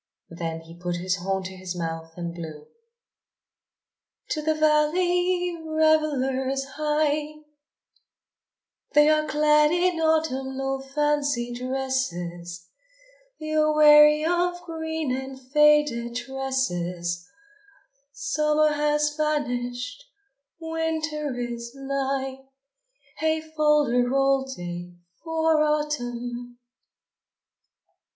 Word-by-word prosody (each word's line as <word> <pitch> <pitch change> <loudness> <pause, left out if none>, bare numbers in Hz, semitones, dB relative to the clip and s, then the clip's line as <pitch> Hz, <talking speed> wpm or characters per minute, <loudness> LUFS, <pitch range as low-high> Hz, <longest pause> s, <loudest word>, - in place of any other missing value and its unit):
Then 165 -1 -4
he 165 +1 -13
put 175 0 -2
his 185 +2 -1
horn 190 +1 -2
to 190 0 -7
his 185 -1 -6
mouth 165 -1 -5
and 170 -1 -4
blew: 160 -3 -8 1.7
To 305 - -1
the 315 +1 +1
valley 350 +4 +2
revellers 285 -4 +1
hie! 305 0 0 1.5
They 295 +1 +6
are 305 0 +2
clad 300 0 +4
in 350 -1 +1
autumnal 270 -4 0
fancy 280 -3 0
dresses, 180 -10 -3 0.7
They 310 0 -4
are 305 0 +3
weary 300 0 +7
of 350 +1 +1
green 320 -4 -3
and 265 0 -6
faded 275 -3 +3
tresses, 180 -10 -2 0.8
Summer 305 +1 +1
has 295 0 +1
vanished, 250 - -2 0.5
Winter 320 -3 -2
is 235 -1 -5
nigh 270 -1 -2 0.8
Hey 315 0 +1
fol 305 -1 +2
de 245 -1 +2
rol 270 +2 +2
day 175 -7 -7 0.3
for 320 -1 +2
Autumn! 245 -5 -2
275 Hz, 90 wpm, -25 LUFS, 240-305 Hz, 1.7 s, weary